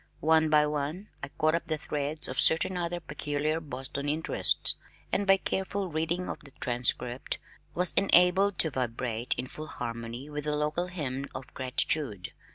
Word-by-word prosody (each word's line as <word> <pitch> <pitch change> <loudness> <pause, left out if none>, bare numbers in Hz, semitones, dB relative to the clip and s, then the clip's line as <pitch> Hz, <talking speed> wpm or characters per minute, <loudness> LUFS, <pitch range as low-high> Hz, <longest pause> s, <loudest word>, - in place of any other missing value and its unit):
One 160 0 +3
by 150 -1 +5
one 150 +7 -3
I - - -4
caught 155 0 0
up 170 - -1
the 155 - -1
threads 150 0 -2
of 130 - -4
certain 165 +3 +5
other 175 0 -2
peculiar 150 0 -2
Boston 140 -1 -5
interests, 155 +2 +3 0.4
and 200 - 0
by 195 0 +7
careful 190 0 -2
reading 165 +3 -2
of - - -5
the 145 - -14
Transcript 125 +2 0 0.4
was 180 +1 +4
enabled 190 0 +5
to 160 - +2
vibrate 120 -2 -2
in - - -2
full 155 +4 -7
harmony 115 +2 -6
with 150 -1 -5
the 150 0 0
local 150 +4 -1
hymn 140 -6 -4
of 130 -1 -8
gratitude. 130 - 0
150 Hz, 165 wpm, -29 LUFS, 130-170 Hz, 0.4 s, by